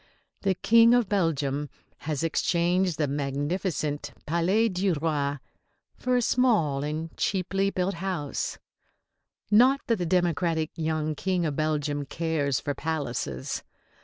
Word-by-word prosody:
The 195 -2 +1
King 230 +4 +6
of 245 -4 +2
Belgium 150 -7 0 0.4
has 150 0 -1
exchanged 175 +1 +1
the 150 - +1
magnificent 145 +1 -2
Palais 180 +8 +2
du 185 -2 0
Roi 145 -2 -1 0.6
for 250 0 0
a 245 - +2
small 205 - +2
and 155 +2 -4
cheaply 195 +1 0
built 185 0 -1
house 170 -5 -3 0.9
not 255 +6 +6
that 230 - +1
the 175 -2 -2
democratic 170 -2 +1
young 155 -1 -1
King 180 +2 -1
of 150 -3 -1
Belgium 145 -2 -1
cares 150 -4 -1
for 145 - -3
palaces. 135 - -3
165 Hz, 125 wpm, -27 LUFS, 145-190 Hz, 0.9 s, King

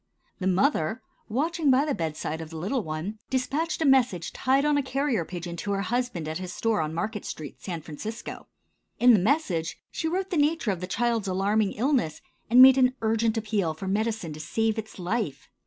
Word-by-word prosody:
The 190 - -1
mother, 190 - +1 0.3
watching 305 +6 0
by 265 +2 +4
the 295 - 0
bedside 160 - -3
of 160 - -7
the 165 - -8
little 210 +11 -1
one, 165 +5 -5
dispatched 300 +6 -1
a - - +1
message 240 - +3
tied 270 +2 +2
on 295 0 +3
a 285 - +3
carrier 265 - 0
pigeon 175 0 -6
to 200 +4 -2
her 195 0 -1
husband 240 -8 -2
at 160 +2 -3
his 185 -1 -5
store 225 -1 0
on 155 0 -2
Market 210 +4 -3
street, 150 -2 -7
San 170 -5 -5
Francisco. 215 +10 -7 0.5
In 245 0 +6
the 210 - +5
message 185 - 0
she 320 - -2
wrote 375 +3 -2
the 350 - 0
nature 295 -6 +2
of 185 -2 -4
the 185 - -4
child's 230 +1 0
alarming 195 +2 +1
illness, 240 - 0 0.3
and 250 +3 +9
made 265 0 +8
an 255 0 +4
urgent 225 0 +1
appeal 205 -7 -1
for 190 +5 -6
medicine 210 -4 -1
to 150 - -9
save 220 +7 0
its 220 0 -8
life. 180 - -3
220 Hz, 200 wpm, -26 LUFS, 175-260 Hz, 0.5 s, and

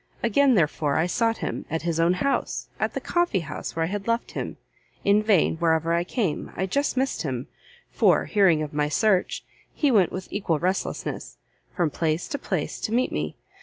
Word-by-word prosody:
Again, 255 +3 +4
therefore, 150 -4 +1
I 160 - +3
sought 225 +5 +1
him, - - -4
at 160 +1 -2
his 170 -1 -1
own 170 +2 +4
house, 275 +10 -1
at - - -1
the - - 0
coffee 345 - +1
house 150 -3 -6
where 165 - 0
I - - 0
had 200 +3 -4
left 230 +1 0
him, - - -5 0.5
in 205 +1 +5
vain, 200 -7 +3
wherever 165 0 +2
I 170 0 +2
came, 185 - -2
I 190 - -1
just 280 +8 0
missed 265 - 0
him, 130 -4 -3 0.5
for, - - +3
hearing 185 -7 +3
of 150 - -6
my 150 0 0
search, 195 +2 +1 0.3
he 290 -3 +2
went 200 -7 +4
with 185 - -7
equal 185 -6 0
restlessness, 185 +5 -3 0.4
from 170 -5 +1
place 160 +2 -1
to 285 -3 -3
place - - -3
to 215 - -2
meet 250 +3 +1
me. - - -3
180 Hz, 195 wpm, -25 LUFS, 160-225 Hz, 0.5 s, in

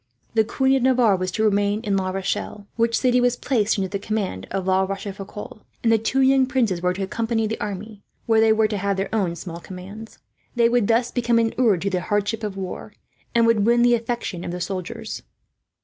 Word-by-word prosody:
The 220 -1 +4
Queen 265 +4 +1
of - - -2
Navarre 245 -5 +4
was 185 0 -2
to 220 - 0
remain 205 0 +2
in 205 -2 -1
La 190 -1 0
Rochelle, 195 +2 -3
which 230 0 +2
city 250 -1 +3
was 245 0 +2
placed 225 -5 0
under 195 -1 0
the 200 +1 -4
command 200 - -3
of 195 -1 -3
La 190 0 +3
Rochefoucault; 195 +2 -6 0.2
and 225 - +3
the 225 - +4
two 250 +5 0
young 265 0 +4
princes 230 -10 0
were 180 0 +2
to 195 - -3
accompany 225 +3 -1
the 220 +1 -3
army, 205 +1 -6 0.2
where 225 -1 +4
they 220 0 +5
were 220 0 +3
to 210 -1 -3
have 200 0 -1 0.4
small 170 0 -7
commands. 195 +5 -10 0.4
They 235 -1 +4
would 240 -4 +2
thus 235 +1 +2
become 240 -1 +1
inured 225 -5 +2
to 200 - -1
the 180 -1 0
hardships 205 +3 -1
of 205 -2 -4
war, 195 +2 -6 0.4
and 230 -1 +5
would 230 -3 +3
win 235 +2 +4
the 240 0 +5
affection 230 -6 -2
of - - -5
the 175 +1 -4
soldiers. 185 0 -5
215 Hz, 210 wpm, -23 LUFS, 195-230 Hz, 0.4 s, they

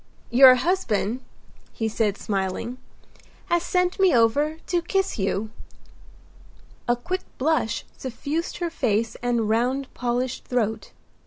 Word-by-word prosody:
"Your 255 +1 +9
husband," 250 - 0 0.5
he 225 - -2
said, 215 -2 0
smiling, 195 +5 -3 0.7
"has 345 0 +3
sent 360 +2 0
me 380 -7 +5
over 285 +7 +3
to 350 -1 0
kiss 385 - -1
you." 200 +2 -1 1.4
A 240 - +3
quick 365 +10 -3 0.2
blush 295 -4 0
suffused 285 +6 -4
her 345 -1 -2
face 225 -6 0
and 240 -2 0
round 250 +5 0
polished 245 +1 -2
throat. 220 -3 -1
245 Hz, 115 wpm, -24 LUFS, 225-320 Hz, 1.4 s, Your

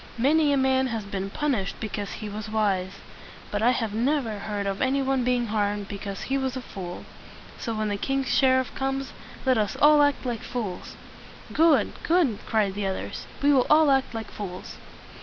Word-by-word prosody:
Many 290 +5 +3
a 280 - +3
man 265 0 +2
has 225 -3 -3
been 195 -1 -4
punished 240 -6 -1
because 205 -2 -4
he 215 - -6
was 210 +1 -6
wise, 195 -4 0 0.6
but 205 - -1
I 235 - +5
have 225 -4 0
never 235 -2 0
heard 205 0 -3
of 195 0 -2
any 265 +2 +2
one 265 -1 +1
being 245 -1 +1
harmed 205 -2 -1
because 200 -1 -6
he 275 +1 0
was 265 -1 -2
a - - -4
fool. 180 -5 -7 0.5
So, 230 -2 -3
when 215 0 -1
the 205 - -1
king's 270 +3 -1
sher 260 -1 +5
iff 260 - -4
comes, 270 0 -2 0.3
let 255 -3 +3
us 210 -2 -1
all 295 0 +7
act 285 -2 +2
like 235 -3 -2
fools." 210 -8 -5 0.6
"Good, 320 -3 +4
good!" 320 - +2
cried 210 -4 +1
the 200 0 -2
others. 190 - -5 0.2
"We 290 0 +5
will 255 -3 +3
all 305 -1 +6
act 265 -3 +1
like 220 -2 -5
fools." 185 -3 -7
230 Hz, 195 wpm, -26 LUFS, 205-270 Hz, 0.6 s, all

